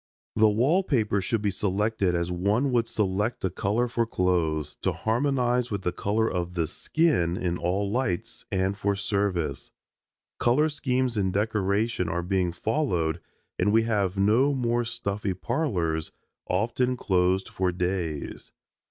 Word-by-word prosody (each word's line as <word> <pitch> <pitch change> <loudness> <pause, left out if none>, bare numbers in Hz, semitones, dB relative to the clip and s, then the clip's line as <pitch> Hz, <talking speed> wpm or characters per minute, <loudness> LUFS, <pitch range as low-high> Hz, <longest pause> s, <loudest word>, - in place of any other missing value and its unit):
The 110 0 +5
wall 135 - +3
paper 110 - +1
should 110 +3 -1
be 100 - +1
selected 100 -1 0
as 85 +1 -1
one 105 +10 +1
would 120 -2 +2
select 105 +1 -1
a 95 - 0
color 105 +7 0
for 115 -1 0
clothes, 85 -7 0
to - - 0
harmonize 125 +1 +1
with 100 -3 -3
the 90 - 0
color 110 +5 0
of 90 -2 -3
the 85 -2 +1
skin 90 - +1
in 90 -2 -1
all 100 +4 0
lights, 115 -2 -2
and 95 0 0
for 100 0 0
service. 95 -7 -1 0.7
Color 145 +6 +3
schemes 130 -4 -1
in 95 -2 +1
decoration 105 -1 0
are 85 +2 -1
being 90 -1 0
followed 85 - -1 0.4
and 105 - +3
we 110 +1 +4
have 100 -4 0
no 115 +9 +3
more 120 -2 +1
stuffy 100 -4 -3
parlors, 90 - -1 0.4
often 120 +6 0
closed 95 -2 +1
for 95 -1 -1
days. 90 -4 -3
100 Hz, 145 wpm, -26 LUFS, 90-120 Hz, 0.7 s, The